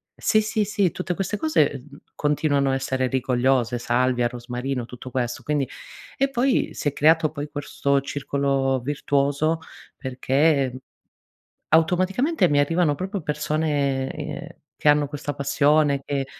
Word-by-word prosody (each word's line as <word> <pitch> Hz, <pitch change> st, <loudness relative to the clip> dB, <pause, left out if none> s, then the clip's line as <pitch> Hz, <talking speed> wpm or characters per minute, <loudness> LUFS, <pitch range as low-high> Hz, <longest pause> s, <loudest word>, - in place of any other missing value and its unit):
Sì, 215 Hz, -, +2 dB
sì, 215 Hz, 0 st, 0 dB
sì, 200 Hz, -3 st, +1 dB
tutte 180 Hz, 0 st, -3 dB
queste 195 Hz, +3 st, -2 dB
cose, 310 Hz, -, +2 dB, 0.2 s
uhm, 140 Hz, -, -14 dB, 0.2 s
continuano 145 Hz, -2 st, +1 dB
a 135 Hz, -, +1 dB
essere 130 Hz, -1 st, -1 dB
rigogliose, 125 Hz, -2 st, +1 dB
salvia, 125 Hz, 0 st, +1 dB
rosmarino, 125 Hz, +1 st, -4 dB
tutto 125 Hz, +1 st, -10 dB
questo. 120 Hz, -2 st, -2 dB
Quindi 145 Hz, -3 st, 0 dB, 0.5 s
e 275 Hz, +1 st, +2 dB
poi 265 Hz, 0 st, +1 dB
si -, -, -3 dB
è 145 Hz, -, +1 dB
creato 155 Hz, +1 st, +4 dB
poi 145 Hz, -1 st, -6 dB
questo 140 Hz, -1 st, 0 dB
circolo 135 Hz, -1 st, -1 dB
virtuoso 145 Hz, +3 st, 0 dB, 0.4 s
perché 130 Hz, 0 st, +1 dB, 0.9 s
automaticamente 185 Hz, -, +3 dB
mi 145 Hz, -, +3 dB
arrivano 160 Hz, +1 st, +2 dB
proprio 190 Hz, +4 st, -4 dB
persone, 150 Hz, -3 st, -1 dB
ehm, 150 Hz, -1 st, -6 dB, 0.3 s
che 150 Hz, -, +1 dB
hanno 145 Hz, -1 st, +2 dB
questa 145 Hz, 0 st, -4 dB
passione 140 Hz, 0 st, +2 dB
che 140 Hz, -2 st, -2 dB
145 Hz, 135 wpm, -23 LUFS, 135-155 Hz, 0.9 s, creato